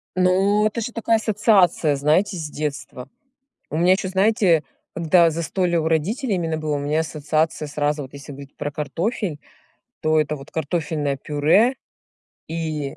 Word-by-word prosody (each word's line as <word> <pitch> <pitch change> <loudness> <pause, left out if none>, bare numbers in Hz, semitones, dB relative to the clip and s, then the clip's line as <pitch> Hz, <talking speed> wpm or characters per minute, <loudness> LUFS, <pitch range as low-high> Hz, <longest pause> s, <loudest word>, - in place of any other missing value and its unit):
Ну, 190 +3 +3
это 215 - -4
же 240 - -4
такая 230 0 +1
ассоциация, 205 -8 +3
знаете, 170 +8 +1
с 160 - -4
детства. 145 -4 -5 0.6
У 155 - -3
меня 175 +2 +4
ещё, 190 0 -2
знаете, 190 -5 +3 0.3
когда 170 0 +4
застолье 170 +2 -1
у 160 - -1
родителей 195 - 0
именно 165 -2 -2
было, 155 -1 -2
у - - -2
меня 150 +3 0
ассоциация 155 0 -1
сразу, 145 0 -1
вот 130 - -12
если 140 +1 -10
говорить 140 0 -11
про 145 - -3
картофель, 165 +3 -3 0.6
то 155 0 +3
это 150 0 -2
вот 135 +1 -12
картофельное 150 -2 -2
пюре 160 - +2 0.7
и 155 -3 -4
160 Hz, 155 wpm, -22 LUFS, 150-190 Hz, 0.7 s, меня